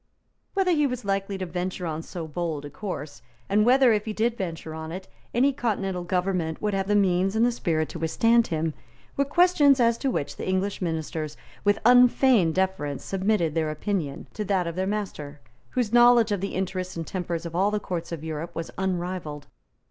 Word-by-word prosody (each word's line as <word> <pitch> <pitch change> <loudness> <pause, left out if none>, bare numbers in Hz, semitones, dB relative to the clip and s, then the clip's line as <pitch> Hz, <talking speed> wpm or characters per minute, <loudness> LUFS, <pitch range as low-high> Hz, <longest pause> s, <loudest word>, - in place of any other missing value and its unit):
Whether 385 -2 +2
he 295 -4 +3
was 250 -3 -5
likely 195 0 -1
to 190 - -3
venture 180 +1 -4
on 160 -1 -3
so 165 -1 -7
bold 155 -2 -3
a 145 - -8
course, 145 - -6 0.3
and 210 +2 +3
whether, 255 -1 +6
if 210 -1 0
he 215 - -3
did 230 +2 0
venture 165 -5 -5
on 160 0 -6
it, 185 +2 -7 0.2
any 270 +4 +3
continental 195 -7 -2
government 180 -2 -1
would 210 -1 -1
have 195 0 -1
the 205 - +2
means 190 0 +2
and 225 +1 +4
the 245 - +3
spirit 160 -9 -1
to 165 - -7
withstand 230 +8 +3
him, 160 -1 -1 0.4
were 280 - +2
questions 295 -3 +4
as 235 -1 +3
to 275 - 0
which 145 - -3
the - - -5
English 190 +2 -1
ministers, 160 -2 -3 0.3
with 205 0 +3
unfeigned 245 -7 +5
deference, 185 -7 -1
submitted 190 -4 0
their 160 -1 0
opinion 155 -2 -3
to 210 - -3
that 190 -3 0
of 170 -1 -4
their 190 +1 -1
master, 180 -8 -4 0.3
whose 240 -3 -1
knowledge 240 -2 +6
of 200 -3 0
the 195 - -3
interests 185 0 -3
and 165 - -3
tempers 175 -2 -4
of 170 0 -6
all 195 +3 +3
the 210 0 -1
courts 175 -5 -5
of 165 -2 -5
Europe 160 +1 -5
was 165 - -5
unrivalled. 175 -5 -3
190 Hz, 200 wpm, -26 LUFS, 165-215 Hz, 0.4 s, whether